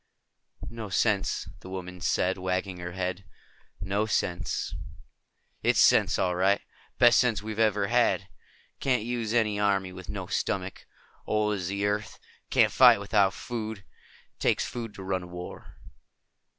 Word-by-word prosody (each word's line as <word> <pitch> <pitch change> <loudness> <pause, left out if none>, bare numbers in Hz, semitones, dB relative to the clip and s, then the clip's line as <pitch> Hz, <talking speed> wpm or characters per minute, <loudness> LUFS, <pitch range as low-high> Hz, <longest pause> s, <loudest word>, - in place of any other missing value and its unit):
"No 115 -3 -6
sense," 100 +1 0
the 95 - -11
woman 90 -1 -7
said, 90 +2 +1
wagging 95 0 -2
her 90 0 -6
head. 95 0 -3 0.6
"No 100 +4 -1
sense." 85 -6 -1 0.9
"It's - - +2
sense, - - +5
all 90 -1 +1
right. 95 +3 +3 0.4
Best 120 -1 +6
sense 115 -5 +1
we've 110 0 -5
ever 105 -2 +3
had. 120 +3 +2 0.5
Can't 125 -5 +1
use 115 -2 -2
an 110 -3 +1
army 100 -2 +1
with 95 -1 -10
no - - -4
stomach. 95 0 -3 0.4
Old 105 0 +1
as 95 -4 -3
the 100 +1 -1
earth. 105 +1 -2 0.3
Can't - - +4
fight - - +7
without 100 -1 +2
food. 110 -3 -5 0.6
Takes - - +1
food 115 -3 -6
to 95 - -8
run 95 0 -1
a 90 - -9
war." 90 0 -9
100 Hz, 145 wpm, -28 LUFS, 95-110 Hz, 0.9 s, fight